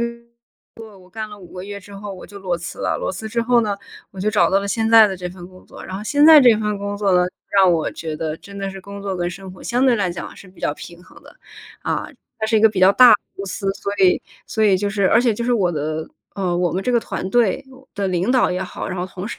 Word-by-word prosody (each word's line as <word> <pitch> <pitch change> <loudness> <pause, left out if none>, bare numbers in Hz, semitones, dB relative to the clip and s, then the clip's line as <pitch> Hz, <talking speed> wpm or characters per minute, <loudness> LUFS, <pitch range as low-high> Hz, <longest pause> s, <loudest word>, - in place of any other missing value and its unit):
个 235 - +1 0.8
工 220 - -13
作， 195 - -16
我 185 0 -19
干 220 +1 -6
了 210 -1 -11
5 180 -3 -14
个 180 0 -7
月 200 0 -7
之 200 +1 -14
后 200 0 -7
我 185 - -11
就 200 +3 -11
裸 185 -3 -2
辞 170 0 -8
了。 - - -1
裸 - - -2
辞 220 +4 -6
之 235 +2 -1
后 240 0 +3
呢， 205 -2 -2 0.4
我 190 - -8
就 210 +3 +1
找 170 -5 +3
到 195 - +2
了 200 - -5
现 225 +1 0
在 225 -1 +8
的 190 -2 -4
这 180 0 -5
份 175 0 -11
工 185 0 -17
作。 - - -12
然 190 - -6
后 200 - -6
现 290 +5 +3
在 315 -1 +10
这 240 -4 +6
份 210 -1 -2
工 200 0 -4
作 200 -2 +1
呢， 180 0 +4 0.3
让 195 -2 +5
我 165 -2 0
觉 160 -1 -6
得 155 0 -3
真 200 +3 -13
的 195 0 -4
是 195 0 -9
工 200 +1 -9
作 195 -2 -3
跟 175 -1 -1
生 185 +1 -9
活 185 - -14
相 245 +2 0
对 255 -3 +4
来 200 -4 0
讲 175 - -7
是 - - -13
比 185 - -19
较 - - 0
平 175 0 -12
衡 - - -18
的。 - - -16 0.5
啊， - - -2 0.3
它 220 - -1
是 220 0 +2
一 - - +3
个 220 - +7
比 205 -3 -5
较 185 +1 +6
大 250 +3 +8
的 - - +8 0.2
公 195 - -5
司， 195 0 -4
所 200 +1 -5
以 185 -2 +4 0.2
所 220 - -2
以 200 -3 +4
就 205 +1 -1
是 200 -2 +1
而 230 - +5
且 240 -3 +2
就 235 - -4
是 245 - +1
我 195 -7 +2
的 155 +1 -3 0.3
呃， 185 -3 -1
我 175 -1 +1
们 185 +3 -2
这 250 - 0
个 235 - +3
团 185 - -5
队 240 +3 +2 0.3
的 200 -1 -2
领 180 +4 0
导 255 -1 +3
也 185 +1 -2
好， 180 - -6
然 185 - -4
后 180 - -2
同 185 +1 -7
事。 235 - -7
200 Hz, 315 characters per minute, -20 LUFS, 185-220 Hz, 0.8 s, 在